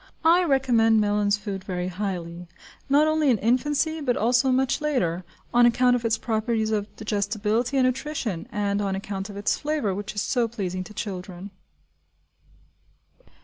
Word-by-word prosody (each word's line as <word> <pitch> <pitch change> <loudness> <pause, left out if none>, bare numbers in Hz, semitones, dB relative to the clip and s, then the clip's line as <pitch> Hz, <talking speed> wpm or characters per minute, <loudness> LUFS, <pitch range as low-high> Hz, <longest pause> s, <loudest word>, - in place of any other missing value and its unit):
I 345 +3 +6
recommend 245 -7 +3
Mellin's 205 0 +2
Food 200 -2 -6
very 180 -1 -3
highly, 180 -3 -5 0.4
not 290 +2 +5
only 310 -2 +2
in 240 - +4
infancy, 295 +8 0
but 250 -4 0
also 245 +4 +2
much 260 +2 +1
later 185 - 0 0.3
on 240 0 +6
account 245 +1 +3
of 240 - -2
its 225 -1 +1
properties 220 -1 -1
of 210 -1 -1
digestibility 215 +4 -1
and 260 - +4
nutrition, 255 - -2
and 205 0 -1
on 195 -1 -1
account 195 0 -5
of 200 - -8
its 200 - 0
flavour, 295 -9 -1
which 205 +2 -6
is 205 - 0
so 240 -3 +1
pleasing 185 -5 -4
to 210 - -11
children. 190 -1 -6
220 Hz, 155 wpm, -25 LUFS, 200-255 Hz, 0.4 s, I